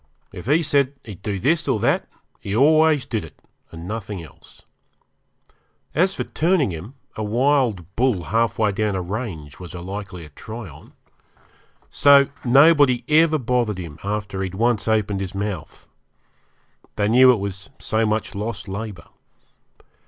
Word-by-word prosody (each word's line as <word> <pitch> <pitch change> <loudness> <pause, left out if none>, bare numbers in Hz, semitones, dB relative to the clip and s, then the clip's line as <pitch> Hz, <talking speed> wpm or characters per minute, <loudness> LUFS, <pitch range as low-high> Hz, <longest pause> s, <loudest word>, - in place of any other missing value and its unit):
If 90 - -9
he 155 +5 +3
said 140 -2 +2
he'd 100 -5 -10
do 100 -1 -3
this 155 - +1
or 130 -6 +1
that - - +1 0.3
he 100 - -4
always 155 +1 +4
did 115 -8 -3
it 80 - -13 0.3
and 80 +1 -9
nothing 105 -4 -5
else. 80 - -17 1.3
As 185 +5 +2
for - - -2
turning 160 - +1
him, 90 - -8 0.2
a - - -5
wild 120 - +1
bull 120 -7 +1
half 115 +4 0
way 110 -2 +2
down 105 0 -1
a 95 - -1
range 90 - -6
was 90 -1 -9
a - - -6
likelier 90 -3 -7
try 110 +9 -9
on. 75 -1 -15 1.0
So 140 -1 +6
nobody 140 -1 +5
ever 155 +1 +4
bothered 120 -5 0
him 80 -4 -8
after 100 -1 -3
he'd 95 -1 -4
once 115 +1 +1
opened 105 -3 +1
his 95 0 -5
mouth. 100 -5 -5 1.1
They 105 - +1
knew 125 +3 +7
it - - +3
was 95 -4 -6
so 110 +1 0
much 110 0 -1
lost 105 0 -5
labour. 100 -3 -6
110 Hz, 150 wpm, -22 LUFS, 95-130 Hz, 1.3 s, knew